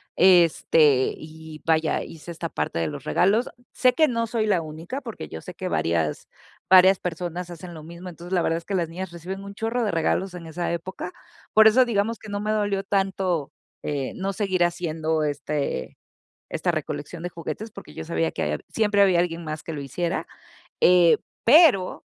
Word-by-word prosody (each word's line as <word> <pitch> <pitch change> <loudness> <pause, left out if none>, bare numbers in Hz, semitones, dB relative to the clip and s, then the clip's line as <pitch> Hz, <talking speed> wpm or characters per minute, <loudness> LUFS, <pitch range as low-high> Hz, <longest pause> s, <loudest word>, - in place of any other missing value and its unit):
Este, 165 -6 +5
y 155 0 -11
vaya, 160 -1 +1
hice 165 +1 -10
esta 165 0 -5
parte 75 - -2
de 85 - 0
los 145 -2 -6
regalos. 200 - +2 0.3
Sé 255 -1 +4
que 315 -1 +4
no 230 -3 0
soy 220 -1 -1
la 190 -5 +2
única 160 - -6
porque 230 -5 -7
yo 80 - -7
sé - - -9
que - - -5
varias 80 -3 -1 0.4
varias 190 0 +7
personas 175 0 -4
hacen 175 +1 -9
lo 155 - -9
mismo. 170 +3 -9
Entonces, 175 +2 -9
la 180 - +3
verdad 165 0 +1
es 170 - -8
que 200 - -5
las 170 -3 0
niñas 180 +2 -6
reciben 185 +3 -7
un 200 0 -8
chorro 225 +3 -1
de 210 - 0
regalos 175 +3 0
en 170 -2 -8
esa 175 +2 -3
época. 180 +1 -5 0.4
Por 220 0 +8
eso, 250 +4 +6
digamos 225 0 0
que 215 - -12
no 205 0 -3
me 215 +1 -1
dolió 205 -2 0
tanto, 190 -6 -1 0.3
eh, 140 -3 -3
no 195 +1 -2
seguir 190 -3 +1
haciendo 160 -2 -1
este 145 - -3 0.5
esta 170 +2 -1
recolección 155 +1 -4
de - - -1
juguetes, 205 +6 -6
porque 75 - -11
yo 80 - -6
sabía 80 0 0
que - - -4
ahí 75 - 0
hab 75 - -4
siempre 210 -2 +2
había 185 -3 +4
alguien 170 -1 0
más 155 -1 -6
que 165 - -5
lo 150 - -5
hiciera. 170 +6 -2 0.6
Eh, 175 -2 +6 0.3
pero, 255 - +5
175 Hz, 195 wpm, -24 LUFS, 155-195 Hz, 0.6 s, Por